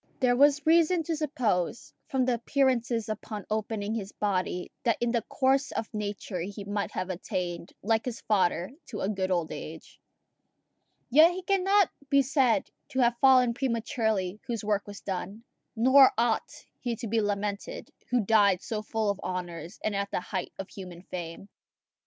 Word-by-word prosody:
There 250 -2 +3
was 285 +2 +4
reason 330 +1 +4
to 325 +1 -2
suppose, 240 - -1
from 260 -1 +1
the 250 - +2
appearances 240 -2 +1
upon 215 -1 -5
opening 215 -1 -2
his 210 -3 -4
body, 185 -3 -2
that 235 -2 +1
in 240 0 +1
the 235 -1 +1
course 270 +4 +1
of 225 - -4
nature 205 -3 -4
he 200 +4 -5
might 205 0 -2
have 185 +1 -2
attained, 175 -1 -4
like 225 +1 +1
his 250 -3 -4
father, 185 -3 +1 0.2
to 215 - -6
a 190 - 0
good 190 -3 -1
old 175 -3 0
age. 155 +1 -9 1.1
Yet 315 +6 +8
he 370 +1 -6
cannot 390 0 +3 0.2
be 280 0 +5
said 270 0 +2 0.2
to 265 - -2
have 240 0 +2
fallen 255 -3 +6
prematurely 225 -6 -1
whose 230 -3 -3
work 205 -1 0
was 205 0 -9
done; 195 +3 -5 0.3
nor 260 +4 +7
ought 230 -1 0
he 240 -2 -2
to 230 - -6
be 225 +1 +1
lamented 205 0 -3 0.2
who 245 -4 +1
died 200 -4 +4
so 215 -2 -3
full 215 -1 -1
of 200 - -6
honours, 175 -1 -5
and 215 -1 -1
at 200 0 -1
the - - -1
height 185 -1 -4
of 195 - -7
human 180 -3 -9
fame. 175 +1 -7
220 Hz, 170 wpm, -28 LUFS, 195-255 Hz, 1.1 s, Yet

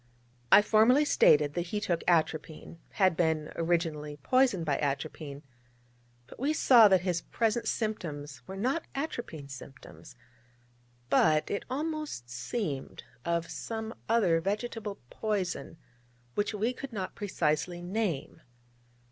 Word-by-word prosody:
I 205 - +9
formally 235 +8 +5
stated 150 - +4
that 175 +1 -2
he 210 +4 -2
took 175 -5 -1
atropine 160 -1 0
had 185 -4 +3
been 160 -2 0
originally 165 -3 -1
poisoned 205 - +2
by 145 -3 0
atropine: 145 0 -3 0.8
but - - -14
we 285 +5 +1
saw 240 -7 +7
that 190 -3 +4
his 175 -2 -1
present 230 +4 -1
symptoms 150 - -3
were 190 - -7
not 260 +10 -1
atropine 240 - -4
symptoms, 135 -1 -12 1.0
but, 155 +2 +3
it 200 - -2
almost 300 - -4
seemed, 140 - -4 0.2
of 170 -1 -1
some 220 0 -5 0.2
other 190 -8 +3
vegetable 210 +1 -3
poison, 195 -6 -3 0.6
which 205 - 0
we 220 +5 0
could 270 +1 -8
not 190 -3 -4
precisely 175 -3 -1
name. 180 -6 -2
180 Hz, 120 wpm, -30 LUFS, 155-220 Hz, 1.0 s, I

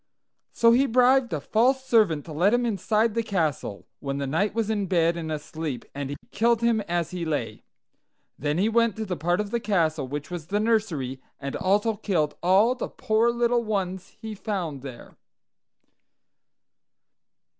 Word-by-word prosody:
"So 230 0 +4
he 260 +4 +4
bribed 250 +1 +4
a 155 - -1
false 255 - +1
servant 210 - +3
to 165 - -9
let 190 +9 +3
him 245 0 +1
inside 220 +1 +1
the 230 - +1
castle, 160 - -2
when 140 0 -3
the 140 - -2
knight 175 +10 0
was 225 -2 0
in 205 -3 -1
bed 170 -2 +2
and 160 -2 -4
asleep, 150 -3 -5
and 140 -1 -4
he 145 - -4 0.2
killed 230 +2 +2
him 235 -2 +2
as 175 -2 -1
he 180 -1 -4
lay. 160 -3 -3 0.7
Then 150 +2 -2
he 195 +4 +2
went 230 -2 +2
to 220 - -4
the 185 -3 -3
part 175 +4 0
of 210 -1 -3
the 235 - 0
castle 165 - 0
which 145 +4 -6
was 170 -3 -6
the 205 +2 0
nursery, 185 - 0 0.2
and 140 -1 -5
also 205 +2 +1
killed 165 -8 0
all 195 +7 +4
the 255 - -5
poor 220 +2 +1
little 235 0 +1
ones 190 -3 -3
he 220 -1 -6
found 185 - -4
there. 130 -3 -10
195 Hz, 175 wpm, -25 LUFS, 160-225 Hz, 0.7 s, So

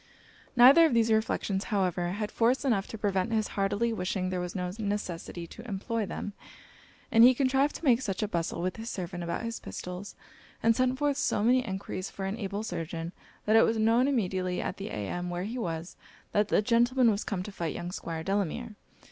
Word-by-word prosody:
Neither 270 +7 +8
of 265 - -1
these 225 -1 +3
reflections 215 -2 0
however 185 -4 0
had 210 +1 -3
force 245 +5 +2
enough 215 -7 +1
to 225 - -7
prevent 200 0 0
his 220 -2 +1
heartily 205 +4 0
wishing 185 -2 -2
there 185 - -1
was 180 +1 -4
no 180 -1 -2
necessity 195 -5 -3
to 225 +8 -11
employ 215 +2 -2
them; 205 - -5 0.8
and 225 0 +7
he 255 +1 +8
contrived 270 +2 +2
to 335 - -7
make 245 -2 +5
such 205 -4 -2
a - - 0
bustle 170 -2 -2
with 185 +3 -2
his 225 +1 -5
servant 180 -3 -5
about 170 +6 -3
his 230 0 -4
pistols, 180 +3 -7 0.5
and 225 0 +4
sent 255 +1 +1
forth 290 0 +1
so 205 - +1
many 250 +3 +4
enquiries 190 -2 -4
for 195 - -6
an 200 +4 -3
able 200 0 -3
surgeon, 165 -3 -4 0.3
that 215 - +3
it 225 - +8
was 225 - +2
known 230 +4 +3
immediately 185 -8 0
at - - -3
the 195 - -5
inn 175 - -3
where 175 0 -3
he 230 +6 -4
was, 165 -4 -4 0.4
that 210 0 +2
the 210 - +2
gentleman 240 +1 +4
was 205 0 -1
come 185 -3 -3
to 205 - -7
fight 170 -4 -3
young 175 +1 -5
Squire 165 -3 -5
Delamere. 205 +4 -2
205 Hz, 205 wpm, -29 LUFS, 185-230 Hz, 0.8 s, Neither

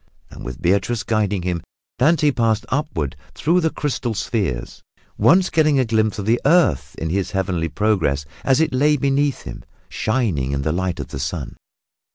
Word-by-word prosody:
And - - -10
with 65 -1 -7
Beatrice 100 +5 +1
guiding 105 -4 0
him, 90 -2 -2 0.4
Dante 150 +1 +4
passed 115 -3 0
upward 120 - -2 0.2
through 170 +4 +2
the 160 - +2
crystal 130 -7 -3
spheres, 95 - -3 0.3
once 185 +2 +4
getting 155 -3 +3
a 130 - +2
glimpse 110 -1 +1
of 100 - -4
the 115 +3 +2
earth 145 - +3
in 80 0 -3
his 95 +1 -1
heavenly 95 -4 -1
progress 95 -9 0 0.2
as 135 0 +3
it 160 -5 +1
lay 150 +3 +3
beneath 140 0 0
him - - -8 0.3
shining 100 - -1
in 70 0 -1
the 75 - 0
light 90 0 -2
of - - -5
the 65 - -6
sun. - - -4
110 Hz, 175 wpm, -21 LUFS, 90-140 Hz, 0.4 s, Dante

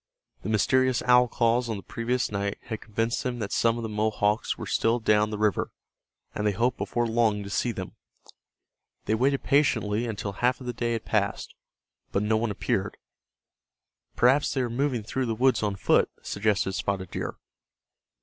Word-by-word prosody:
The 100 - -5
mysterious 130 +3 +2
owl 125 0 +5
calls 120 0 +1
on 110 - -2
the 100 - -9
previous 120 +6 -2
night 100 0 -2
had 110 -2 -6
convinced 115 +2 -1
them 125 -1 -3
that 105 -4 -4
some 115 0 +2
of 120 - -4
the - - -2
Mohawks 105 0 0
were - - -6
still 115 +2 +1
down 105 -1 +3
the 105 - -4
river, 105 -1 +1 0.6
and 105 - -1
they 105 - +2
hoped 120 +4 0
before 120 0 -1
long 110 -3 +1
to 100 - -8
see 120 - 0
them. 95 -4 -6 1.1
They - - +1
waited 135 +5 +1
patiently 120 -6 +2
until 105 -2 -4
half 125 +5 0
of 130 - -10
the 125 - -3
day 120 0 -1
had 115 - -4
passed, - - -1 0.6
but 100 - 0
no 110 +1 +2
one 115 +1 0
appeared. 100 0 -2 1.2
"Perhaps 135 +5 +3
they 130 - +1
are 120 -2 -2
moving 125 -2 0
through 130 +4 -2
the 115 - -1
woods 130 +3 +3
on 105 -2 -1
foot," - - +3
suggested 100 -2 0
Spotted 95 -2 -2
Deer. - - -4
115 Hz, 180 wpm, -27 LUFS, 105-125 Hz, 1.2 s, owl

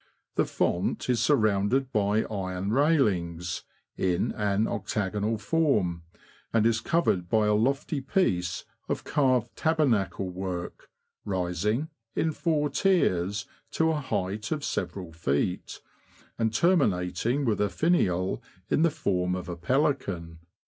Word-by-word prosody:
The - - +2
font 90 +7 0
is 120 -2 +1
surrounded 115 0 +2
by 105 -1 +2
iron 95 -1 -3
railings, 95 - +1 0.3
in 90 -2 +1
an 105 0 +1
octagonal 105 +1 -1
form, 105 - +1 0.5
and 115 -1 +3
is 115 -1 +2
covered 95 - +1
by 110 +1 +3
a 105 - +3
lofty 135 +6 0
piece 90 - 0 0.2
of - - -2
carved 130 -5 +1
tabernacle 130 - +1
work, 90 -1 -5 0.3
rising, 100 - -1 0.3
in 160 - +1
four 150 -2 0
tiers, 105 - +2 0.3
to 160 0 +2
a 150 -2 -1
height 105 -3 -3
of 150 -2 -1
several 90 -4 -3
feet, 80 +2 -1 0.6
and 110 -1 +2
terminating 115 - +2
with 110 -4 +1
a 105 - +2
finial 95 - +1 0.3
in - - +3
the 170 - +5
form 90 - 0
of 90 -1 -5
a 90 - -4
pelican. 90 - -1
105 Hz, 125 wpm, -27 LUFS, 90-140 Hz, 0.6 s, the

